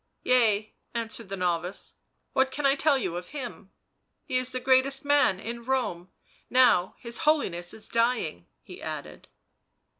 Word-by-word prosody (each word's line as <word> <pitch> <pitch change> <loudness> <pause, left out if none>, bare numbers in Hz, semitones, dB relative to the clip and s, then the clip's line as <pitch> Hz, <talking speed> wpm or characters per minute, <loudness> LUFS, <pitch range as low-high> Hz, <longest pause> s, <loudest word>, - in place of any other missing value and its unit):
" - - -49
Yea," 220 -4 +3 0.2
answered 230 -2 -4
the 195 - -4
novice. 180 +1 -2 0.2
" - - -48
What 265 0 +3
can 280 +2 -3
I 275 - +6
tell 285 0 +3
you 185 -8 -2
of 180 0 -7
him? 245 -8 -7 0.5
He - - -4
is 255 0 -1
the 255 - -2
greatest 265 +2 +3
man 285 -10 +4
in 235 +3 -6
Rome 230 -9 -1 0.2
— - - -34
now 185 -7 +3
his 235 -1 -4
Holiness 280 - +1
is 220 0 -5
dying," 230 - 0 0.2
he - - -11
added. - - -7
235 Hz, 170 wpm, -27 LUFS, 190-265 Hz, 0.5 s, I